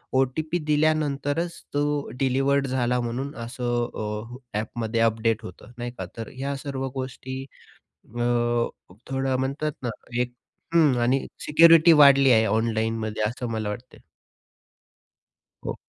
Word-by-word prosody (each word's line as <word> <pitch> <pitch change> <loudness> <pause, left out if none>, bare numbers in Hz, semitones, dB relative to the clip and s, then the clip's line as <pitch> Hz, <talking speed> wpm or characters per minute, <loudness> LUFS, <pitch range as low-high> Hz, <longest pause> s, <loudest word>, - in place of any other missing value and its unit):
OTP 150 +6 +1
दिल्यानंतरच 155 +1 0
तो 145 0 0
delivered 135 +1 +2
झाला 125 -1 0
म्हणून 130 +4 -3
असं 120 -1 -1
अ, 115 +3 -5
ॲपमध्ये 115 +1 -3
अपडेट 115 0 +1
होतं. 105 +3 -11
नाही 120 0 -4
का? 95 - -4
तर 115 - -5
ह्या 140 +2 -3
सर्व 135 -2 -3
गोष्टी 130 0 -5 0.7
अ, 120 +2 -7 0.9
थोडं 135 0 0
म्हणतात 140 +3 -1
ना 120 - -1 0.3
एक 125 0 -1 0.4
हं 150 -6 +5
आणि 130 +3 +1 0.2
सिक्युरिटी 165 +1 +7
वाढली 140 -3 +7
आहे 110 -1 +5
ऑनलाईनमध्ये 110 0 -1
असं 120 +2 -3
मला 110 -2 -2
वाटते. 120 +4 -8 1.6
हो. - - -3
130 Hz, 120 wpm, -25 LUFS, 115-140 Hz, 1.6 s, सिक्युरिटी